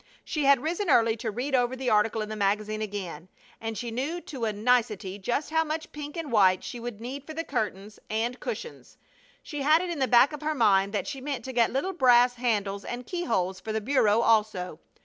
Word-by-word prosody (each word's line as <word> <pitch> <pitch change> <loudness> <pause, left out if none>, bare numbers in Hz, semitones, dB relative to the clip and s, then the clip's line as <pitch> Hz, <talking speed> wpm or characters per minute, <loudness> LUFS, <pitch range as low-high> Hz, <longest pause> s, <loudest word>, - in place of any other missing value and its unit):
She 300 -3 -1
had 280 0 +7
arisen 335 +8 -2
early 230 -4 +4
to 225 0 -3
read 250 +6 -4
over 250 0 +2
the 260 -1 -1
article 215 +1 +2
in 215 - -7
the 215 - -4
magazine 215 +1 0
again, 185 -5 -5 0.3
and 225 -1 -4
she 240 -2 -4
knew 280 +9 -2
to 260 -8 -5
a 220 - 0
nicety 210 -3 0
just 245 +10 -2
how 320 0 +3
much 320 +1 -4
pink 295 +1 -7
and 325 -4 -4
white 190 -4 +4
she 240 - -6
would 235 -3 -6
need 260 +4 -6
for 315 +1 -9
the 330 - -2
curtains 210 - -4
and 230 +3 -1
cushions. 475 - -7 0.5
She 295 -3 -5
had 305 +3 +5
it 360 0 -3
in 330 - -4
the 265 - +2
back 255 +4 +5
of 300 - -7
her 310 0 -1
mind 200 -5 +3
that 205 - -1
she 275 -2 -6
meant 270 -4 -4
to 260 - -5
get 235 -2 +3
little 290 +9 -1
brass 245 -5 +5
handles 205 -5 -1
and 245 0 -6
keyholes 190 - -1
for 220 - -6
the 220 - 0
bureau 225 -2 +3
also. 210 -8 +1
240 Hz, 225 wpm, -27 LUFS, 210-280 Hz, 0.5 s, had